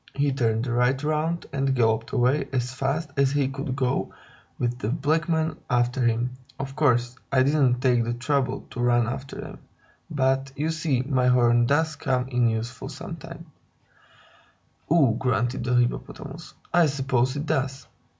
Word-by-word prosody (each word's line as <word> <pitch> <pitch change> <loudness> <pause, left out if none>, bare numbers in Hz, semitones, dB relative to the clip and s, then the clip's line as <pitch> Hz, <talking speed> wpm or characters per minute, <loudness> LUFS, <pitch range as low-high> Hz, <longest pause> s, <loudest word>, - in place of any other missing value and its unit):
He 140 0 +1
turned 115 -3 0
right 125 +3 +1
round 155 +3 -1
and 135 -1 +1
galloped 115 -2 +1
away 130 +5 +2
as 125 -1 -1
fast 145 +4 -2
as 140 0 +3
he 145 -2 +2
could 135 -1 -4
go, 130 -2 -1 0.5
with 120 0 -2
the 105 - -2
black 155 +4 0
men 160 -1 0
after 125 +1 +1
him. 120 +1 +1 0.3
Of 135 0 -5
course, 125 -4 +2 0.2
I 130 -2 +4
didn't 135 -3 +2
take 125 -3 +3
the 120 +1 -2
trouble 130 +1 -1
to - - -7
run 120 -1 +3
after 130 +4 -5
them. - - -8 0.5
But, 135 -2 0
you 155 +2 -1
see, 155 -5 0
my 130 -2 +1
horn 120 -1 +4
does 155 +2 +1
come 130 -2 0
in 120 -2 +2
useful 115 +2 -4
sometimes." - - -8 1.4
"Ugh!" 135 -8 +4
grunted 125 -1 0
the 125 0 +1
Hippopotamus. 120 0 -2 0.2
"I 175 -2 +5
suppose 130 -2 0
it 145 +1 -3
does. 135 -2 -2
130 Hz, 160 wpm, -25 LUFS, 120-140 Hz, 1.4 s, I